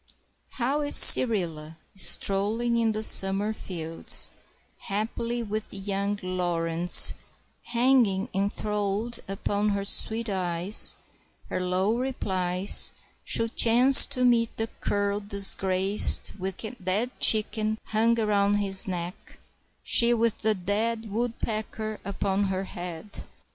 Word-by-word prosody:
How 270 Hz, +4 st, -3 dB
if 290 Hz, 0 st, -6 dB
Cyrilla, 165 Hz, -9 st, +5 dB, 0.2 s
strolling 205 Hz, +5 st, -1 dB
in 225 Hz, -1 st, -1 dB
the 215 Hz, 0 st, -5 dB
summer 195 Hz, +1 st, +5 dB
fields, 165 Hz, -5 st, -1 dB, 0.6 s
haply 230 Hz, +4 st, -5 dB
with 215 Hz, 0 st, -7 dB
young 200 Hz, +1 st, -5 dB
Laurence 175 Hz, -1 st, +4 dB, 0.5 s
hanging 235 Hz, -5 st, 0 dB
enthralled 210 Hz, +3 st, -4 dB
upon 200 Hz, +2 st, -4 dB
her 200 Hz, -1 st, -4 dB
sweet 225 Hz, +3 st, -1 dB
eyes, 185 Hz, 0 st, +5 dB, 0.6 s
her -, -, -4 dB
low 185 Hz, +4 st, -2 dB
replies, 190 Hz, -7 st, -1 dB, 0.3 s
should 230 Hz, 0 st, -2 dB
chance 245 Hz, +4 st, +5 dB
to 255 Hz, -3 st, -1 dB
meet 230 Hz, -2 st, 0 dB
the 225 Hz, 0 st, -4 dB
cur 205 Hz, 0 st, -3 dB
disgraced 195 Hz, -1 st, +2 dB
with 190 Hz, 0 st, -6 dB
the 220 Hz, -, -7 dB
dead 205 Hz, +7 st, -2 dB
chicken 215 Hz, 0 st, +3 dB
hung 230 Hz, +2 st, 0 dB
around 205 Hz, -2 st, -1 dB
his 195 Hz, -2 st, +1 dB
neck, 180 Hz, 0 st, -8 dB, 0.5 s
she 235 Hz, 0 st, +2 dB
with 230 Hz, -1 st, -2 dB
the 220 Hz, 0 st, -1 dB
dead 215 Hz, +4 st, -4 dB
woodpecker 220 Hz, -1 st, -6 dB
upon 200 Hz, 0 st, -3 dB
her 190 Hz, 0 st, -4 dB
head! 180 Hz, +1 st, -8 dB
205 Hz, 110 wpm, -24 LUFS, 190-225 Hz, 0.6 s, Cyrilla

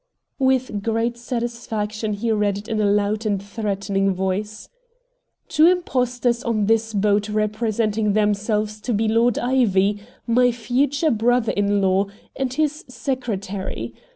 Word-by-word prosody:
With 260 Hz, -5 st, +1 dB
great 225 Hz, +2 st, 0 dB
satisfaction 230 Hz, -3 st, -3 dB
he 225 Hz, +3 st, -1 dB
read 205 Hz, -2 st, +1 dB
it 205 Hz, +2 st, -9 dB
in 220 Hz, -2 st, -1 dB
a 205 Hz, -, +3 dB
loud 205 Hz, +1 st, +1 dB
and 205 Hz, -3 st, 0 dB
threatening 195 Hz, -1 st, -1 dB
voice: 190 Hz, +3 st, -3 dB, 0.8 s
"Two 310 Hz, +2 st, +5 dB
impostors 250 Hz, -8 st, +1 dB
on 220 Hz, -3 st, 0 dB
this 225 Hz, +1 st, +2 dB
boat 205 Hz, 0 st, +1 dB
representing 215 Hz, 0 st, 0 dB
themselves 210 Hz, 0 st, 0 dB
to 240 Hz, -1 st, -1 dB
be 220 Hz, +2 st, +1 dB
Lord 230 Hz, +2 st, +3 dB
Ivy, 210 Hz, -5 st, +2 dB, 0.2 s
my 245 Hz, +1 st, +3 dB
future 265 Hz, +6 st, 0 dB
brother 240 Hz, +1 st, +2 dB
in 205 Hz, 0 st, +1 dB
law, 190 Hz, +1 st, +2 dB, 0.3 s
and 265 Hz, -2 st, -2 dB
his 305 Hz, +3 st, -1 dB
secretary. 220 Hz, -8 st, -4 dB
215 Hz, 130 wpm, -22 LUFS, 205-245 Hz, 0.8 s, Two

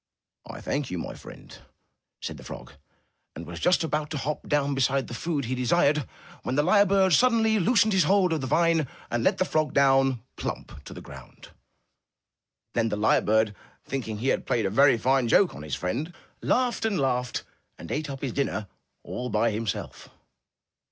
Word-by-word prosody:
'1 -, -, -9 dB
thank 140 Hz, -1 st, -2 dB
you, 90 Hz, -, -4 dB
my -, -, -5 dB
friend/' -, -, -13 dB, 0.6 s
said -, -, -5 dB
the -, -, -12 dB
frog, 60 Hz, -, -9 dB, 0.6 s
and 85 Hz, -, -7 dB
was 85 Hz, +1 st, -8 dB
just 180 Hz, -1 st, +3 dB
about 150 Hz, -1 st, -2 dB
to 155 Hz, -, -4 dB
hop 145 Hz, +3 st, -4 dB
down 145 Hz, -1 st, +1 dB
beside 135 Hz, 0 st, +1 dB
the -, -, -9 dB
food 145 Hz, +2 st, -2 dB
he 125 Hz, -, -2 dB
desired, 140 Hz, +2 st, +2 dB, 0.3 s
when 130 Hz, -, -3 dB
the 145 Hz, -, +3 dB
lyre 200 Hz, +4 st, +5 dB
bird 190 Hz, -1 st, +3 dB
suddenly 225 Hz, -3 st, +4 dB
loosened 220 Hz, +2 st, +3 dB
his 190 Hz, -, +4 dB
hold 190 Hz, -3 st, +3 dB
of 155 Hz, -, -1 dB
the 130 Hz, -, -3 dB
vine 165 Hz, 0 st, +2 dB, 0.2 s
and 120 Hz, -1 st, 0 dB
let -, -, +2 dB
the 185 Hz, -, +1 dB
frog 155 Hz, -4 st, -1 dB
down, 135 Hz, -2 st, +4 dB, 0.2 s
plump! 70 Hz, -, -6 dB
to -, -, -9 dB
the -, -, -8 dB
ground. -, -, -13 dB, 1.2 s
Then 115 Hz, -1 st, +1 dB
the 105 Hz, -, -2 dB
lyre 105 Hz, -, +3 dB
bird, 110 Hz, 0 st, +2 dB, 0.3 s
thinking 115 Hz, -6 st, -4 dB
he 125 Hz, +5 st, -1 dB
had -, -, -1 dB
played 115 Hz, -4 st, +1 dB
a 95 Hz, -, 0 dB
very 135 Hz, +3 st, +5 dB
fine 130 Hz, +1 st, +2 dB
joke 185 Hz, -, +4 dB
on -, -, -9 dB
his 75 Hz, -3 st, -4 dB
friend, 115 Hz, -, -3 dB, 0.3 s
laughed 250 Hz, -2 st, +1 dB
and 215 Hz, -6 st, 0 dB
laughed, 125 Hz, -2 st, -1 dB, 0.3 s
and 85 Hz, -, -9 dB
ate 150 Hz, 0 st, -2 dB
up 135 Hz, -1 st, -6 dB
his 130 Hz, -4 st, -2 dB
dinner 135 Hz, -6 st, -1 dB, 0.4 s
all 125 Hz, 0 st, -5 dB
by 115 Hz, -, +1 dB
himself. 105 Hz, -2 st, -4 dB
135 Hz, 190 wpm, -26 LUFS, 115-165 Hz, 1.2 s, lyre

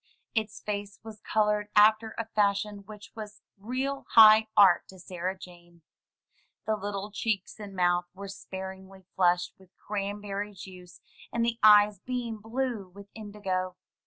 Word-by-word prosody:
Its 215 Hz, -2 st, -2 dB
face 205 Hz, -1 st, -5 dB
was 220 Hz, -2 st, -11 dB
colored 210 Hz, -1 st, 0 dB
after 215 Hz, +1 st, +4 dB
a 230 Hz, -, -2 dB
fashion 205 Hz, -1 st, 0 dB
which 210 Hz, -1 st, -12 dB
was 215 Hz, -2 st, -10 dB
real 260 Hz, +7 st, -4 dB
high 220 Hz, -1 st, +8 dB
art 190 Hz, -4 st, +6 dB
to 190 Hz, -, -14 dB
Sarah 185 Hz, +1 st, -5 dB
Jane. 175 Hz, -2 st, -15 dB, 0.8 s
The 220 Hz, -, +1 dB
little 205 Hz, 0 st, -5 dB
cheeks 210 Hz, -1 st, -3 dB
and 200 Hz, -2 st, -9 dB
mouth 175 Hz, -1 st, +2 dB
were 200 Hz, +1 st, -8 dB
sparingly 190 Hz, -1 st, -9 dB
flushed 175 Hz, -1 st, +2 dB
with 190 Hz, -1 st, -22 dB
cranberry 205 Hz, 0 st, -4 dB
juice, 180 Hz, -1 st, -12 dB, 0.3 s
and 235 Hz, 0 st, 0 dB
the 235 Hz, 0 st, -2 dB
eyes 210 Hz, -1 st, +6 dB
beamed 235 Hz, -2 st, -4 dB
blue 225 Hz, -3 st, -3 dB
with 200 Hz, +2 st, -14 dB
indigo. 195 Hz, -4 st, -4 dB
205 Hz, 140 wpm, -28 LUFS, 190-215 Hz, 0.8 s, high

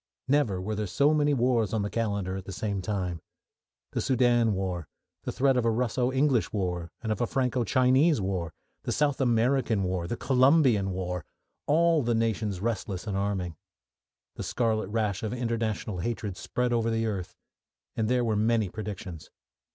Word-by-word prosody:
Never 130 Hz, -9 st, +2 dB
were 100 Hz, +4 st, -3 dB
there 105 Hz, 0 st, -2 dB
so 145 Hz, +11 st, +3 dB
many 150 Hz, -1 st, +3 dB
wars 120 Hz, -4 st, +1 dB
on 105 Hz, -, 0 dB
the 100 Hz, -, -2 dB
calendar 100 Hz, -5 st, -1 dB
at 95 Hz, -1 st, -6 dB
the -, -, -7 dB
same 100 Hz, +1 st, -2 dB
time. 90 Hz, -4 st, -3 dB, 0.7 s
The -, -, -1 dB
Soudan 120 Hz, -4 st, +3 dB
war, 90 Hz, -4 st, -3 dB, 0.4 s
the -, -, -1 dB
threat 135 Hz, -1 st, +2 dB
of 125 Hz, -, +2 dB
a 115 Hz, -, +3 dB
Russo 125 Hz, +2 st, 0 dB
English 135 Hz, -3 st, +2 dB
war 90 Hz, -4 st, -2 dB
and 110 Hz, -, -1 dB
of 105 Hz, -, -2 dB
a 120 Hz, -, +1 dB
Franco 125 Hz, -2 st, 0 dB
Chinese 130 Hz, -, +3 dB
war, 95 Hz, -4 st, -2 dB, 0.3 s
the -, -, -3 dB
South 145 Hz, -1 st, +1 dB
American 120 Hz, -3 st, +2 dB
war, 90 Hz, -2 st, -2 dB
the 120 Hz, -, -3 dB
Colombian 130 Hz, -6 st, +4 dB
war 90 Hz, -1 st, -3 dB, 0.4 s
all 165 Hz, +1 st, +4 dB
the 120 Hz, -2 st, +1 dB
nations 110 Hz, -4 st, -1 dB
restless 105 Hz, -4 st, -2 dB
and 105 Hz, -3 st, -3 dB
arming. 95 Hz, -4 st, -2 dB, 0.8 s
The -, -, -4 dB
scarlet 110 Hz, -4 st, 0 dB
rash 105 Hz, -2 st, -1 dB
of 110 Hz, +1 st, -3 dB
international 115 Hz, -5 st, -2 dB
hatred 105 Hz, 0 st, -3 dB
spread 125 Hz, +5 st, -1 dB
over 115 Hz, -1 st, +1 dB
the 115 Hz, 0 st, 0 dB
earth, 100 Hz, -5 st, -4 dB, 0.6 s
and 110 Hz, 0 st, 0 dB
there 125 Hz, -1 st, +2 dB
were 110 Hz, -2 st, +1 dB
many 110 Hz, -1 st, +2 dB
predictions. 95 Hz, -5 st, -7 dB
110 Hz, 175 wpm, -28 LUFS, 95-125 Hz, 0.8 s, Colombian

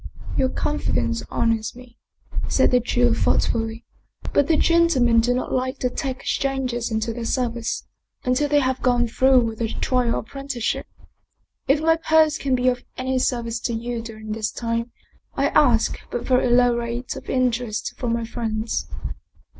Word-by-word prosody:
"Your 260 Hz, -, +2 dB
confidence 245 Hz, -6 st, -1 dB
honors 225 Hz, -1 st, 0 dB
me," 250 Hz, -1 st, -15 dB, 0.5 s
said -, -, +3 dB
the 250 Hz, -, +5 dB
Jew 245 Hz, 0 st, +2 dB
thought -, -, +2 dB
fully. 225 Hz, 0 st, -2 dB, 0.2 s
" -, -, -11 dB
But 285 Hz, -, +3 dB
the 320 Hz, -, +3 dB
gentlemen 305 Hz, -10 st, +4 dB
do 235 Hz, +2 st, +2 dB
not 250 Hz, +1 st, -1 dB
like 255 Hz, 0 st, -1 dB
to 250 Hz, -, -1 dB
take 265 Hz, +1 st, -4 dB
strangers 260 Hz, -4 st, -1 dB
into 220 Hz, +1 st, -1 dB
their 235 Hz, 0 st, -5 dB
service, 235 Hz, -1 st, -2 dB, 0.4 s
until 255 Hz, +4 st, +1 dB
they 290 Hz, 0 st, +4 dB
have 260 Hz, -1 st, -1 dB
gone 245 Hz, -1 st, +2 dB
through 260 Hz, +2 st, +4 dB
with 225 Hz, -1 st, -3 dB
a 230 Hz, -, +1 dB
trial 245 Hz, +1 st, 0 dB
apprenticeship. 275 Hz, -1 st, -3 dB, 0.8 s
If 290 Hz, +3 st, +3 dB
my 325 Hz, +1 st, +4 dB
purse 315 Hz, -1 st, +3 dB
can 270 Hz, -2 st, +1 dB
be 250 Hz, 0 st, 0 dB
of 245 Hz, -1 st, +1 dB
any 260 Hz, 0 st, 0 dB
service 235 Hz, -2 st, -1 dB
to 235 Hz, -, -2 dB
you 235 Hz, +1 st, -3 dB
during 220 Hz, -1 st, -8 dB
this 215 Hz, 0 st, -2 dB
time 230 Hz, 0 st, -2 dB, 0.4 s
I 280 Hz, +1 st, +2 dB
ask 245 Hz, -7 st, +3 dB
but 240 Hz, -, -3 dB
very 255 Hz, -1 st, +3 dB
low 245 Hz, 0 st, +4 dB
rates 235 Hz, +1 st, -3 dB
of -, -, -9 dB
in 255 Hz, -1 st, +2 dB
terest 235 Hz, -2 st, -4 dB
from 240 Hz, -2 st, -2 dB
my 230 Hz, 0 st, -1 dB
friends." 225 Hz, -1 st, -3 dB
245 Hz, 170 wpm, -23 LUFS, 230-260 Hz, 0.8 s, the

